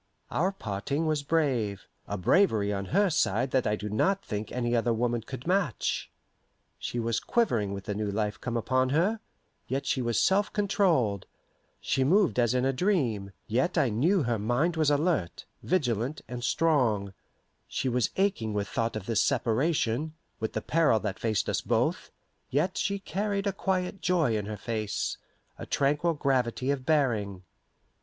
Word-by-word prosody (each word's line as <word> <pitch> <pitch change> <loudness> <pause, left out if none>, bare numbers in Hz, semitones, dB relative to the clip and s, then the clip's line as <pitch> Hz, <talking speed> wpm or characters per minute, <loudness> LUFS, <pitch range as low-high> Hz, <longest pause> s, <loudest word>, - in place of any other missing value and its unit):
Our 185 +4 +1
parting 140 - -3
was 155 -2 +1
brave 130 -10 0 0.2
a 100 - -3
bravery 105 - +3
on 100 0 -3
her 195 - +2
side 125 -4 +1
that 130 -2 +2
I 105 - +2
do 105 0 -6
not 190 - +1
think 105 0 -4
any 120 -1 0
other 120 0 +2
woman 120 0 0
could 125 +3 -8
match. 180 - 0 0.7
She 120 - -3
was 115 -1 0
quivering 120 - +1
with 100 0 -5
the 105 - -3
new 105 0 -2
life 105 +1 -2
come 120 -2 -2
upon 130 +3 +1
her, 180 +11 +1 0.5
yet 135 +2 -2
she 130 - 0
was 120 -1 0
self 195 +1 +2
controlled; 170 - +1 0.5
she 135 - 0
moved 180 0 +3
as 120 0 +2
in 125 0 +2
a 135 - +2
dream, 125 - 0
yet 130 +11 0
I 140 -6 +3
knew 155 - +2
her 120 -3 0
mind 125 +11 +1
was 155 -2 +2
alert, 145 - 0 0.2
vigilant, 130 - 0
and 120 +1 -6
strong; 120 -10 +1 0.5
she 130 - -2
was 125 -2 +1
aching 190 - 0
with 100 -1 -1
thought 115 +2 -2
of 105 -3 -5
this 115 -1 +2
separation, 140 +3 0 0.2
with 110 - -3
the 110 - -2
peril 155 -8 +3
that 100 -2 -3
faced 110 -3 0
us - - 0
both, - - 0 0.4
yet 165 +8 0
she 200 0 0
carried 200 +1 -2
a 200 - 0
quiet 190 -1 -2
joy 165 -10 +2
in 105 -1 -2
her 105 -1 -5
face, 110 -3 -2 0.4
a - - -7
tranquil 150 +4 +1
gravity 130 -2 0
of 135 -2 -3
bearing. 110 - +1
130 Hz, 170 wpm, -28 LUFS, 110-165 Hz, 0.7 s, bravery